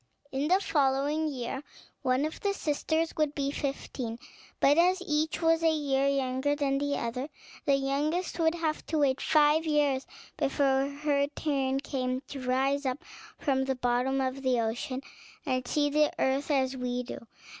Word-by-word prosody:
In 275 +2 -1
the 370 +3 +4
following 290 -2 +1
year, 265 -2 -4 0.4
one 255 +3 +2
of 310 - -5
the 400 -1 0
sisters 315 +1 0
would 300 -2 +1
be 280 -1 -1
fifteen: 270 -5 -4 0.4
but 285 - +5
as 360 +3 +4
each 310 +1 0
was 325 0 +4
a 325 - +4
year 280 -3 +1
younger 275 +1 +1
than 275 -1 0
the 285 0 0
other, 250 +5 -3 0.4
the 280 - +4
youngest 295 +7 -1
would 325 0 +3
have 320 -2 -2
to 315 - -1
wait 275 -3 +2
five 305 0 +4
years 295 -4 +1 0.3
before 270 0 +2
her 285 0 0
turn 270 -3 0
came 255 -2 -2
to 275 - -6
rise 270 +3 +1
up 260 +6 -3 0.3
from 265 -2 +1
the 265 0 0
bottom 250 +2 +1
of 260 +1 -2
the 255 -2 +2
ocean, 240 +4 -2 0.4
and 255 -3 -1
see 290 +1 +1
the 300 0 +3
earth 270 +3 0
as 265 -2 +1
we 250 -1 -2
do. - - -7
280 Hz, 165 wpm, -29 LUFS, 265-300 Hz, 0.4 s, but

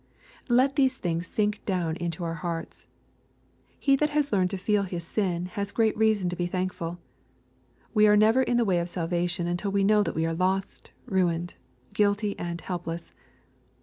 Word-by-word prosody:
Let 260 +4 +3
these 265 -2 +3
things 170 0 -2
sink 210 +1 -1
down 175 -5 -1
into 170 0 -3
our 165 -1 -2
hearts. 165 0 -5 0.9
He 275 -1 +3
that 300 +2 +1
has 295 -4 0
learned 185 -2 +3
to 195 - -3
feel 205 +2 +1
his 180 -3 -4
sins 180 -1 -1
has 200 +1 -4
great 220 -2 +2
reason 215 -4 +2
to - - -3
be 175 0 -1
thank 185 +1 -2
ful. 170 +1 -5 1.0
We 215 -2 +5
are 210 0 +6
never 220 +5 +5
in 245 -2 +1
the 240 - +3
way 185 -4 +2
of 170 +1 -3
salvation 175 0 -1
until 175 +4 -1
we 200 0 +2
know 210 +1 +4
that 205 - -2
we 160 - +1
are 165 - -1
lost, 190 +3 -1 0.2
ruined, 175 -2 0 0.4
guilty, 205 0 +1
and 170 0 -4
helpless. 170 -2 -5
185 Hz, 180 wpm, -27 LUFS, 175-210 Hz, 1.0 s, are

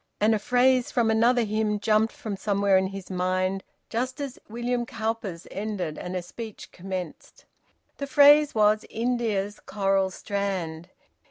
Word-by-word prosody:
And 215 +2 +4
a 215 - +1
phrase 250 +3 +3
from 230 -2 +2
another 235 +2 +3
hymn 215 -1 0
jumped 215 +1 +2
from 245 -9 -5
somewhere 200 -1 +1
in 190 0 +3
his 195 -1 -8
mind 185 +1 0 0.2
just 255 +3 -3
as 280 -3 -5
William 240 +2 -1
Cowper's 220 -6 -4
ended 195 -6 -4
and 180 +1 -5
a 180 - -2
speech 220 +4 -9
commenced. 185 -2 -7 0.5
The 280 - -4
phrase 290 0 +6
was 215 0 +4
`India's 220 -4 -1
coral 195 -2 0
strand.' 185 -5 -3
215 Hz, 145 wpm, -26 LUFS, 190-235 Hz, 0.5 s, phrase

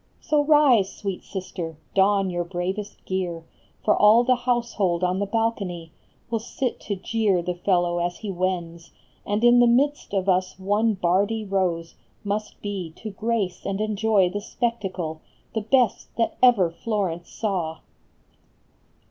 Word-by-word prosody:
So 300 -2 +1
rise, 285 -10 +5
sweet 195 -3 -5
sister, 180 -4 -6 0.2
don 195 -1 +3
your 175 0 -1
bravest 190 +4 -5
gear, 175 -3 -3 0.4
For 210 - +4
all 215 +3 +6
the 255 +1 +4
household 235 -8 0
on 180 +1 +1
the 200 - -1
balcony 195 -7 -2 0.4
Will 230 - +1
sit 245 +2 -3
to 205 - -4
jeer 195 -2 0
the 180 +1 -2
fellow 175 -1 +1
as 175 0 -2
he 210 -3 -5
wends, 175 -2 -3 0.4
And 205 +2 0
in 240 0 +7
the 240 - +6
midst 270 -1 +1
of 190 0 0
us 185 0 +1
one 205 +3 +1
Bardi 200 +5 +1
Rose 180 -4 -1 0.3
Must 210 +1 -3
be 195 -5 -4
to 220 - -7
grace 205 -3 -2
and 195 0 -2
enjoy 215 -2 +2
the 205 - -3
spectacle, 190 -9 -3 0.3
The 220 - -1
best 240 +1 +2
that 230 - 0
ever 220 -9 +5
Florence 180 -3 -3
saw 180 -7 -3
195 Hz, 150 wpm, -24 LUFS, 180-225 Hz, 0.4 s, in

